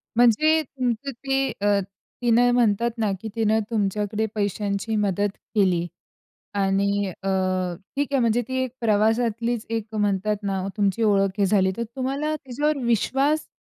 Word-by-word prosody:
म्हणजे 245 +7 +4
तुमचं 255 0 -3
ते 270 +2 -1
अ, 205 0 +3 0.4
तिनं 245 0 +4
म्हणतात 235 -1 +2
ना 215 -3 +1
की 225 - -5
तिनं 220 -1 +2
तुमच्याकडे 210 0 -1
पैशांची 205 +1 -1
मदत 205 -1 +1 0.3
केली 185 -4 +3 0.7
आणि 200 0 +1 0.2
अ, 195 - -2 0.7
ठीक 285 0 +1
आहे 275 - +3
म्हणजे 235 0 +2
ती 260 0 -1
एक 255 - -2
प्रवासातलीच 225 +1 +1
एक 225 -2 -2
म्हणतात 210 0 +1
ना 195 -1 -1
ओ, 195 - -3
तुमची 205 +1 +1
ओळख 195 -2 +2
हे 200 - +3
झाली. 190 -1 +3
तर 235 - -2
तुम्हाला 275 +4 -1
त्याच्यावर 295 +2 -1
विश्वास 270 +6 +1
220 Hz, 145 wpm, -24 LUFS, 205-245 Hz, 0.7 s, म्हणजे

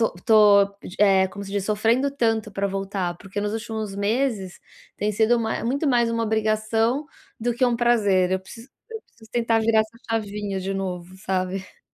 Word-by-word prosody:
tô 225 - +2
tô 175 - -17
tô, 210 -2 +7 0.2
d 180 - -9
eh, 195 -2 +5
como 200 +2 -8
se 195 - -9
diz, 200 -2 -1
sofrendo 225 +6 +1
tanto 225 -5 0
pra 200 +1 -1
voltar, 195 -2 -3
porque, 195 +1 -6
nos 205 0 -2
últimos 220 -2 -4
meses, 210 -2 -1 0.4
tem 210 +1 -1
sido 225 +3 +3
mai 220 -1 -2
muito 280 +5 0
mais 240 -3 +3
uma 230 0 -1
obrigação 220 +5 0 0.3
do 240 +1 0
que 255 - +2
um 240 -2 +2
prazer. 205 -6 +2
Eu 190 - 0
preciso 230 +6 -12 0.2
eu 445 - -6
preciso 220 -1 -21
tentar 230 -1 +2
virar 220 0 +3
essa 220 +2 -6
chavinha 205 -3 -2
de 190 +1 -3
novo, 185 -2 -5
sabe. 185 0 -3
215 Hz, 190 wpm, -23 LUFS, 195-230 Hz, 0.4 s, tô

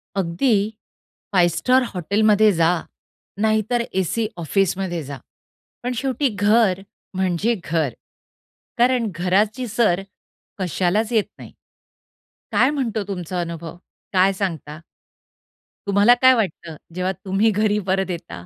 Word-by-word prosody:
अगदी 195 +6 +1 0.8
5 175 -3 +3
स्टार 255 +5 +3
हॉटेलमध्ये 210 +4 +3
जा, 165 0 +2 0.6
नाहीतर 220 +2 +1
एसी 190 +4 -1
ऑफिसमध्ये 180 0 -1
जा, 140 0 -7 0.7
पण 250 +1 -2
शेवटी 270 +1 0
घर 205 -1 +3 0.3
म्हणजे 190 +5 0
घर. 155 -6 -1 0.8
कारण 245 -2 +2
घराची 205 +8 +1
सर 210 -5 +1 0.6
कशालाच 190 +5 0
येत 220 -3 +3
नाही. - - -11 1.0
काय 260 - +4
म्हणतो 240 -7 -2
तुमचा 180 -2 -4
अनुभव, 170 -1 -6 0.4
काय 190 0 +4
सांगता? 165 -6 -4 1.1
तुम्हाला 200 +4 +5
काय 260 0 +7
वाटतं, 170 -7 -3 0.2
जेव्हा 185 +1 -1
तुम्ही 195 +4 +2
घरी 210 0 +1
परत 190 0 0
येता? 170 - -7
195 Hz, 110 wpm, -21 LUFS, 175-220 Hz, 1.1 s, काय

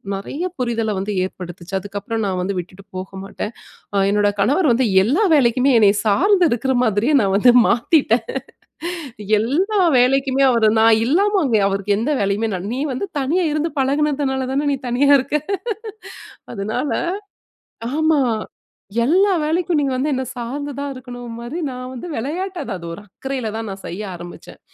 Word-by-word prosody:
நெறைய 275 - -5 0.2
புரிதல 230 -3 -1
வந்து 205 +2 -3
ஏற்படுத்துச்சு. 175 -1 -9
அதுக்கப்பறம், 205 +2 -4
நான் 185 -2 -2
வந்து 195 +2 -2
விட்டுட்டு 185 +2 -10
போக 185 +1 -6
மாட்டேன். 205 +3 -6 0.4
அ - - +2
என்னோட 205 0 +3
கணவர் 285 - +3
வந்து 240 0 +2 0.2
எல்லா 295 - +2
வேலைக்குமே, 255 0 +3
என்னைய 205 -1 +5
சார்ந்து 365 - +4
இருக்குற 255 +3 0
மாதிரியே 225 +7 +2
நான் 195 -2 +1
வந்து 245 +4 +6 0.2
மாத்திட்டேன் 235 -2 +2 1.2
எல்லா 370 - +1 0.2
வேலைக்குமே, 270 +2 +3
அவர் 230 -3 +3
நான் 225 -1 +5
இல்லாம 395 +7 +2
அங்க 235 -6 +2
அவருக்கு 200 +1 0
எந்த 250 +7 -1
வேலையுமே 200 +3 0
நான் 185 +3 -4
நீ 265 - -3
வந்து 260 +11 -3
தனியா 325 +7 +1
இருந்து 305 +2 -1
பழகுனதுனாலதான 275 -1 0
நீ - - 0
தனியா 265 +4 +2
இருக்க! 275 +3 -1 1.2
அதுனால 220 +8 -2 1.1
ஆமா 315 0 +3 0.9
எல்லா 380 +8 +4
வேலைக்கும் 330 +2 0
நீங்க 275 -2 0
வந்து 275 +4 0
என்ன 260 0 -1
சார்ந்து 270 +5 -4
தான் 285 0 -3
இருக்கணும்மாரி, 245 +1 -7
நான் 255 0 -7
வந்து 255 +7 -7
விளையாட்ட 355 +10 -3
அது, - - -7
அது, 170 - -10
ஒரு 185 - -9
அக்கறையில 260 +4 -5
தான் 225 0 -4
நான் 195 0 -7
செய்ய 185 +5 -6
ஆரமிச்சேன். 175 0 -11
250 Hz, 150 wpm, -20 LUFS, 210-285 Hz, 1.2 s, வந்து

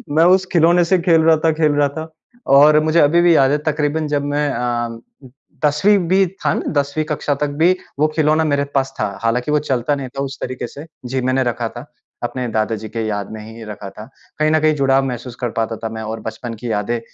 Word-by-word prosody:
मैं 165 - +5
उस 190 -1 -2
खिलौने 170 +1 +4
से 185 +1 +2
खेल 165 -2 +3
रहा 160 0 +4
था, 160 - +5
खेल 155 -1 +1
रहा 145 0 +3
था 160 0 -5 0.5
और 150 +1 +7
मुझे 160 +2 +2
अभी 165 +4 +4
भी 170 -2 +5
याद 135 -1 +4
है 150 - +2
तकरीबन 150 +1 -1
जब 145 -1 -1
मैं 145 0 0
अ, 120 -1 -2 0.7
10वीं 190 +8 +3
भी 190 +2 +4 0.2
था - - +3
ना, - - -2 0.2
10वीं 145 +2 -3
कक्षा 150 -1 -1
तक 150 +1 -1
भी 180 +2 +5 0.2
वो 155 - +4
खिलौना 155 0 +2
मेरे 140 0 +1
पास 135 0 0
था। 100 - -2
हालाँकि 125 +5 0
वो 150 - +3
चलता 130 +3 +1
नहीं 135 -2 -5
था 135 +2 -5
उस 135 0 -6
तरीके 125 -1 -4
से। 145 +6 -10 0.2
जी, 130 +1 -2
मैंने 130 +1 +1
रखा 120 -1 -2
था, 120 +4 -9 0.4
अपने 125 +1 -3
दादा 110 +1 0
जी 110 0 -8
के 115 -1 -3
याद 105 -1 -3
में 110 -1 -7
ही 110 +1 -10
रखा 105 -2 -8
था। 105 +2 -11 0.3
कहीं 155 0 +2
न 155 - +3
कहीं 155 0 +3
जुड़ाव 135 -1 +2
महसूस 125 -1 -5
कर 120 - 0
पाता 115 0 -1
था 110 - -2
मैं 110 0 -6
और 110 +1 -5
बचपन 115 +2 -6
की 120 -2 -3
यादें 110 +3 -1
140 Hz, 235 wpm, -18 LUFS, 120-155 Hz, 0.7 s, और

